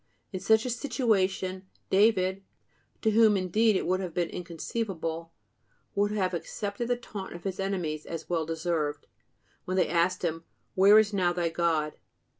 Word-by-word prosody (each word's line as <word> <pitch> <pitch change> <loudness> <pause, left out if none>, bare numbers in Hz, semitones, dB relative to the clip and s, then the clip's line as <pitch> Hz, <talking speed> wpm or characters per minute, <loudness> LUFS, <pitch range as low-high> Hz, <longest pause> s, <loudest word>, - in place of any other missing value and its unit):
In 185 - -2
such 220 +4 +3
a 250 - -1
situation, 195 -7 0 0.2
David 190 -2 +3 0.6
(to 220 - +3
whom 215 -1 +5
indeed 210 +4 +2
it - - 0
would 185 +1 +1
have 180 -3 -5
been 175 -1 0
inconceivable) 170 -2 -4 0.6
would 205 +1 +2
have 190 -3 -1
accepted 200 +6 -4
the 245 - +2
taunt 210 -5 -8
of 175 - -10
his 190 -1 -4
enemies 175 -6 -2
as 165 -1 -6
well 170 -2 0
deserved, 160 -3 -2 0.6
when 185 +1 -2
they 185 - +3
asked 175 +2 +1
him: 165 0 -2 0.3
"Where 200 +3 +7
is 215 -1 +4
now 180 -3 +2
thy 175 -1 0
God?" 160 -2 0
185 Hz, 160 wpm, -28 LUFS, 170-210 Hz, 0.6 s, Where